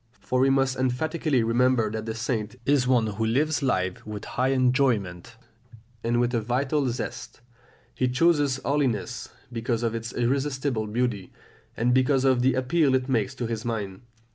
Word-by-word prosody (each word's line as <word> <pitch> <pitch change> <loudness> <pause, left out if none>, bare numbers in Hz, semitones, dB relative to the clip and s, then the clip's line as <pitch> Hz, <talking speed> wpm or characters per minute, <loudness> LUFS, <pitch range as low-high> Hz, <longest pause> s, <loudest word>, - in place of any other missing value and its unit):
For 130 - -1
we 135 +1 +4
must 135 -1 +2
emphatically 130 +1 0
remember 115 -1 +2
that 110 0 -5
the 110 - -3
saint 110 -1 -3
is 140 -3 +2
one 125 -3 +3
who 110 +1 -3
lives 145 +8 +1
life 95 -9 -1
with 105 -1 -7
high 130 - -1
enjoyment, 125 -7 +1 0.7
and 120 +1 +1
with 120 0 +1
a 115 - +1
vital 130 +4 0
zest; 120 0 -6 0.5
he 130 - 0
chooses 140 0 +2
holiness 140 -5 -1 0.2
because 115 0 -2
of 115 -1 0
its 115 +1 -4
irresistible 130 -2 -1
beauty, 110 -4 -2 0.5
and 120 +2 +2
because 130 +1 +3
of 130 -2 +3
the 130 0 +3
appeal 130 +2 +2
it 130 +1 -1
makes 130 0 0
to 125 - -3
his 115 -1 -3
mind. 105 -4 -4
125 Hz, 165 wpm, -26 LUFS, 115-135 Hz, 0.7 s, we